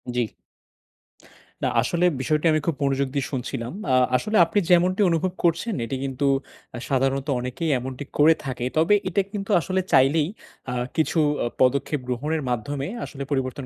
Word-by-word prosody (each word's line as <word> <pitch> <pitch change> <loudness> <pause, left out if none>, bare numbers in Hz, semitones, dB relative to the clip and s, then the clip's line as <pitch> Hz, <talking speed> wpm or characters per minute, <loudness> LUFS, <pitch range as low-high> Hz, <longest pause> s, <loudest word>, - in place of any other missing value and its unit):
জি। 120 -4 0 1.3
না, - - +2
আসলে 170 +8 0 0.2
বিষয়টি 150 +4 0
আমি 155 - +2
খুব 165 - +1
মনোযোগ 140 0 +1
দিয়ে 140 - 0
শুনছিলাম। 120 0 -4 0.2
আ 130 - +4 0.2
আসলে 215 - -1
আপনি 205 +5 +1
যেমনটি 180 +3 +4
অনুভব 170 +2 0
করছেন 170 +7 +1
এটি 125 +4 -4
কিন্তু 135 +1 -1 0.5
আ - - -5
সাধারণত 135 +1 +1
অনেকেই 125 +7 -3
এমনটি 130 +2 -6
করে 155 +2 +6
থাকে। 125 -2 -3
তবে 165 +6 +4
এটা 190 +2 +1
কিন্তু 200 +1 -4
আসলে 185 +2 -1
চাইলেই 145 +4 +4 0.4
আ - - -3 0.2
কিছু 160 +1 +1 0.3
আ - - 0 0.2
পদক্ষেপ 140 +3 +2
গ্রহণের 150 +6 -1
মাধ্যমে 135 +4 -2 0.2
আসলে 140 -1 -7
পরিবর্তন 135 0 -2
145 Hz, 160 wpm, -24 LUFS, 130-165 Hz, 1.3 s, করে